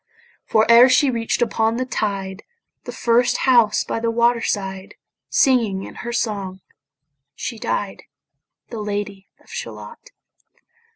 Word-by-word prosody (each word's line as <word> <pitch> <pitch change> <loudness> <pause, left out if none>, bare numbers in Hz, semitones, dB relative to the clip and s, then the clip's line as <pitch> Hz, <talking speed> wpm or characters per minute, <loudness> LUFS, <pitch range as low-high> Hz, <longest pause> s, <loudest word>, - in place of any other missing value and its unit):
For 220 0 +3
ere 235 +2 +8
she 260 +2 +4
reach'd 230 0 0
upon 225 0 0
the 255 - -1
tide 195 -5 -3 0.4
The - - -6
first 240 +1 +2
house 235 -5 +4
by - - -3
the 230 0 -1
water 235 +1 +2
side, 195 -3 -4 0.3
Singing 230 -8 +2
in - - -9
her 240 - -5
song 200 -5 -3 0.7
she 230 -3 -6
died, 205 -4 -3 0.6
The 230 - -6
Lady 205 -1 -4
of - - -20
Shalott. 480 +1 -8
225 Hz, 130 wpm, -21 LUFS, 200-240 Hz, 0.7 s, ere